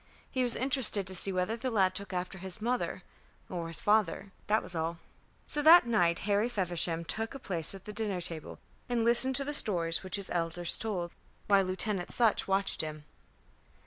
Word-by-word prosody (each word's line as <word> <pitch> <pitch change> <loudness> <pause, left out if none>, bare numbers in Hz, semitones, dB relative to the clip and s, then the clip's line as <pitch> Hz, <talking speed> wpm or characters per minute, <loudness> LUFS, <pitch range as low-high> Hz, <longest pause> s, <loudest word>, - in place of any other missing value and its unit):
He 260 - -1
was 245 -2 +3
interested 255 -6 0
to 190 - -2
see 190 +2 +3
whether 185 +4 -1
the 250 +3 -4
lad 190 -5 +2
took 200 +2 -7
after 185 +1 -5
his 190 +2 -8
mother 240 +3 -3 0.5
or 170 -2 -5
his 165 - -3
father 205 -2 +1 0.2
that 215 +1 +1
was - - -5
all. 165 0 -3 0.5
So 295 - -2
that 320 0 +8
night 175 -8 +1
Harry 210 +3 +1
Feversham 175 -5 -1
took 225 +8 -4
a - - -4
place 175 - -2
at 190 - -13
the 210 - -8
dinner 205 -3 -2
table 165 -3 -8 0.3
and 235 -2 0
listened 240 +3 +4
to 275 +1 +3
the 295 - -4
stories 170 - +5
which 185 - -4
his 200 -2 +1
elders 170 0 0
told, 185 -6 -4 0.3
while 200 -1 +3
Lieutenant 185 0 -2
Sutch 230 -3 +2
watched 195 0 +1
him. 155 -1 -7
195 Hz, 190 wpm, -30 LUFS, 175-225 Hz, 0.5 s, that